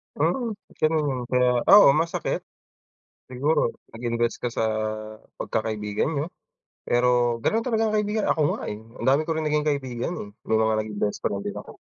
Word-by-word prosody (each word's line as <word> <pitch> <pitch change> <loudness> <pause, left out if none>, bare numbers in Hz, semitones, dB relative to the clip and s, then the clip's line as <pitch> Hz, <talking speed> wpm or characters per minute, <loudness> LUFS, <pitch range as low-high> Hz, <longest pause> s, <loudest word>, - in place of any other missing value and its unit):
Mm, 215 - 0 0.2
ganun 155 0 +2
yun 130 -1 -3
kaya 125 0 +4 0.2
oo 205 0 +10
masakit, 170 - -2 0.9
siguro 145 +5 +1 0.3
nag 115 - -10
invest 115 0 0
ka 120 - 0
sa 110 - +1 0.7
pagkakaibigan 105 -1 -2
niyo, 150 0 -1 0.6
pero 120 -1 +2
ganon 225 +1 +1
talaga 225 -3 +1
ang 215 - 0
kaibigan 210 0 0
ako 155 - +2
nga, - - -6
eh, 105 - -5 0.2
ang - - -4
dami 140 +3 +4
ko 165 - -2
rin 160 -1 -2
naging 150 0 +1
kaibigan, 130 0 -2
eh, 105 - -8 0.2
may 110 - +3
mga 110 0 +2
naging 105 -1 -5
bestfriend 100 -1 -1
din - - -4
ako. - - -14
130 Hz, 170 wpm, -25 LUFS, 115-160 Hz, 0.9 s, oo